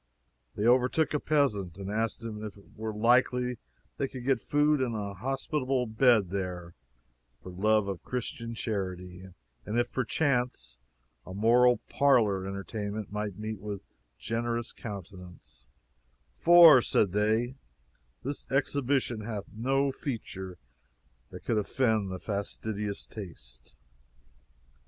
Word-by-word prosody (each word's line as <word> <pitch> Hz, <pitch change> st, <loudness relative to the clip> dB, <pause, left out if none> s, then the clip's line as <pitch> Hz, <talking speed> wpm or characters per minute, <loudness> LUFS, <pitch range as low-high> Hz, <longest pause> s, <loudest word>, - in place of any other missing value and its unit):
They 105 Hz, -, -1 dB
overtook 130 Hz, +6 st, +3 dB
a 150 Hz, -, +1 dB
peasant, 105 Hz, -, 0 dB
and 100 Hz, 0 st, -5 dB
asked 110 Hz, +1 st, -1 dB
him 110 Hz, -2 st, -6 dB
if 105 Hz, -2 st, -7 dB
it 100 Hz, -, -19 dB
were 110 Hz, 0 st, -4 dB
likely 125 Hz, +2 st, +2 dB, 0.4 s
they 140 Hz, -, 0 dB
could 130 Hz, -2 st, -8 dB
get 135 Hz, -3 st, +2 dB
food 145 Hz, -1 st, +2 dB
and 120 Hz, -3 st, -1 dB
a 100 Hz, -2 st, -4 dB
hospitable 135 Hz, -, -1 dB
bed 110 Hz, -4 st, +3 dB
there, 90 Hz, -3 st, -4 dB, 0.7 s
for 90 Hz, -, -8 dB
love 105 Hz, +3 st, +2 dB
of 95 Hz, -3 st, -4 dB
Christian 115 Hz, -2 st, -5 dB
charity, 95 Hz, -4 st, -4 dB, 0.4 s
and 105 Hz, +3 st, -3 dB
if 120 Hz, 0 st, 0 dB
perchance, 125 Hz, -, -1 dB, 0.4 s
a 90 Hz, -, -9 dB
moral 120 Hz, +4 st, +5 dB
parlor 110 Hz, -9 st, +3 dB
entertainment 100 Hz, +1 st, -5 dB
might 105 Hz, -2 st, -3 dB
meet 110 Hz, -1 st, -5 dB
with 100 Hz, -1 st, -6 dB, 0.3 s
generous 115 Hz, +1 st, -2 dB
countenance 95 Hz, -4 st, -10 dB, 0.7 s
"for," 165 Hz, -, +8 dB
said 100 Hz, -4 st, +2 dB
they, 110 Hz, +5 st, +1 dB, 0.7 s
"this 140 Hz, +3 st, -5 dB
exhibition 135 Hz, -3 st, +1 dB
hath 105 Hz, -2 st, -5 dB
no 135 Hz, +5 st, +1 dB
feature 95 Hz, -9 st, -6 dB, 0.7 s
that -, -, -11 dB
could 110 Hz, -, +2 dB
offend 110 Hz, -2 st, +1 dB
the 95 Hz, -, -5 dB
most 95 Hz, -, -8 dB
fastidious 100 Hz, 0 st, -3 dB
taste." 65 Hz, -, -10 dB
110 Hz, 125 wpm, -29 LUFS, 100-125 Hz, 0.7 s, for